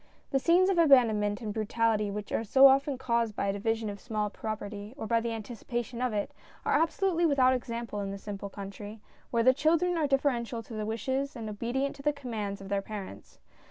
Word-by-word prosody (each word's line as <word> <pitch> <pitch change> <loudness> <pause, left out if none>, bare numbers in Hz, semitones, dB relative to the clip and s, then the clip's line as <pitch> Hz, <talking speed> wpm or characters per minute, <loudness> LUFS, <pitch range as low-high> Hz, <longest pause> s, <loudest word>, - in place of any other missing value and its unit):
The 270 - +2
scenes 355 +6 +4
of 360 - +1
abandon 255 -9 +6
ment 205 +1 -1
and 215 -2 -4
brutality 220 -1 +1
which 205 0 -5
are - - 0
so 265 +5 +6
often 275 0 +5
caused 235 -4 0
by 200 - -1
a - - +1
division 225 +2 -1
of 200 -1 -5
a - - -21
small 215 -3 -2
property 210 +1 -6
or 220 - -5
by 230 +1 +2
the 235 0 -2
anticipation 235 +2 -5
of 250 -1 +1
it, 205 -1 -2 0.3
are - - +1
absolutely 335 +2 +2
without 260 -3 +4
example 235 -3 -4
in 200 -1 -3
the 195 - -5
simple 200 0 -6
country, 205 +2 -8 0.3
where 230 -1 +1
the 255 +2 +6
children 335 +5 +2
are 300 - +2
deferential 245 -4 0
to 225 - -11
the 215 -1 -3
wishes, 260 +6 -2
and 225 -3 -6
obedient 240 +6 -2
to - - -9
the 295 +1 +1
commands 220 -8 -4
of 195 - -9
their 200 0 0
parents. 195 - -8
230 Hz, 215 wpm, -29 LUFS, 210-270 Hz, 0.3 s, abandon